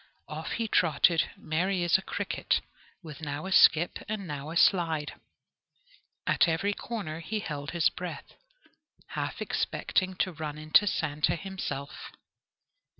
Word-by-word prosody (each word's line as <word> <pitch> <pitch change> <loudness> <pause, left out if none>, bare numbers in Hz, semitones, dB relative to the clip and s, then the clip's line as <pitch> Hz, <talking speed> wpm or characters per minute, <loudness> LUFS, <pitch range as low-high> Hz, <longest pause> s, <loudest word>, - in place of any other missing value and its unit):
Off - - -5
he 230 -1 -1
trotted, 165 -2 +3
merry 180 +2 0
as 175 - +3
a 190 - +4
cricket, - - -1 0.4
with 155 -2 -9
now 145 +1 -4
a 190 - -4
skip, 175 -2 +5
and 215 -2 -3
now 145 -2 -5
a 165 - -2
slide. 165 -6 +3 1.1
At - - +4
every 170 +5 +1
corner 200 -9 -5
he 205 +7 -3
held 145 -7 -5
his 170 -2 +3
breath, 170 -5 -7 0.8
half - - -3
expecting 185 0 -1
to 185 +1 0
run 155 -2 -5
into 155 +7 +4
Santa 150 -5 +1
himself. 170 -6 -5
165 Hz, 135 wpm, -29 LUFS, 155-190 Hz, 1.1 s, skip